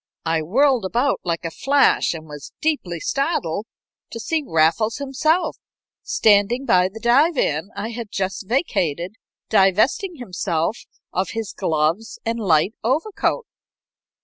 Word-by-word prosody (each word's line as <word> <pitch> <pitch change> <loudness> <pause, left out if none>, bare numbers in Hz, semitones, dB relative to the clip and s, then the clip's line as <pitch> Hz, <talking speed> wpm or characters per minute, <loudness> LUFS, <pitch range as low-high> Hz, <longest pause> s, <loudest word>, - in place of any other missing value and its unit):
I 165 -1 +1
whirled 250 - +2
about 240 +9 0
like 170 -1 -2
a 165 - -3
flash, 280 - +2
and 160 -1 -8
was 150 -2 -10
deeply 280 - -1
startled 220 - -1 0.4
to 230 - -7
see 315 +6 -1
Raffles 165 - +2
himself 310 +5 0 0.4
standing 215 +5 +3
by 180 -4 +4
the 220 +4 -10
divan 235 - +2
I 205 +3 -4
had 230 -2 -6
just 195 0 -3
vacated, 180 - 0 0.4
divesting 220 - +3
himself 185 - -2 0.3
of 185 +1 -1
his 225 -3 -4
gloves 165 +8 -1
and 230 +1 -1
light 185 -1 +2
overcoat. 330 - 0
215 Hz, 125 wpm, -21 LUFS, 170-270 Hz, 0.4 s, by